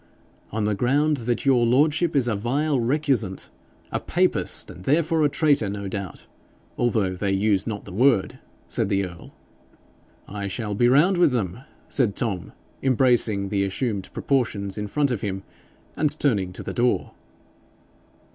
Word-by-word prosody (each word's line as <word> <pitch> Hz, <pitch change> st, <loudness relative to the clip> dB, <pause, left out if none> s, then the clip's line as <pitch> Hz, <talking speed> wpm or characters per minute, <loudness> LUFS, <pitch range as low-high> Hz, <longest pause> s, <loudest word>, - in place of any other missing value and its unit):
'On 110 Hz, 0 st, -2 dB
the 105 Hz, 0 st, +1 dB
ground 140 Hz, +8 st, +2 dB
that 120 Hz, +2 st, -1 dB
your 130 Hz, -3 st, +4 dB
lordship 150 Hz, +7 st, +2 dB
is 130 Hz, -4 st, +3 dB
a 115 Hz, -, +1 dB
vile 135 Hz, +7 st, 0 dB
recusant 125 Hz, -6 st, 0 dB, 0.4 s
a -, -, -1 dB
papist, -, -, 0 dB
and 90 Hz, -, -12 dB
therefore 160 Hz, +2 st, +2 dB
a 145 Hz, -, +4 dB
traitor, 145 Hz, -8 st, +2 dB
no 100 Hz, 0 st, -5 dB
doubt, 95 Hz, -2 st, -6 dB, 0.5 s
although 110 Hz, -6 st, +1 dB
they 95 Hz, +2 st, -2 dB
use 100 Hz, 0 st, +1 dB
not 105 Hz, -3 st, -4 dB
the -, -, -9 dB
word,' 120 Hz, -1 st, +2 dB, 0.3 s
said -, -, -1 dB
the 100 Hz, 0 st, +1 dB
earl. 85 Hz, -2 st, -11 dB, 1.0 s
'I 100 Hz, 0 st, -5 dB
shall 105 Hz, +1 st, -3 dB
be 120 Hz, +4 st, +3 dB
round 165 Hz, +9 st, +4 dB
with 165 Hz, -7 st, +4 dB
them,' 105 Hz, -3 st, -2 dB, 0.3 s
said 115 Hz, -7 st, +1 dB
Tom, 100 Hz, -7 st, -3 dB, 0.3 s
embracing 120 Hz, -6 st, +2 dB
the 100 Hz, -1 st, +1 dB
assumed 100 Hz, 0 st, -2 dB
proportions 105 Hz, -8 st, -1 dB
in 105 Hz, -1 st, -3 dB
front 140 Hz, +5 st, 0 dB
of 115 Hz, -, -2 dB
him, 95 Hz, -3 st, -3 dB, 0.5 s
and 150 Hz, 0 st, 0 dB
turning 100 Hz, -10 st, +1 dB
to -, -, -7 dB
the -, -, -5 dB
door. 120 Hz, 0 st, +1 dB
115 Hz, 155 wpm, -24 LUFS, 100-140 Hz, 1.0 s, your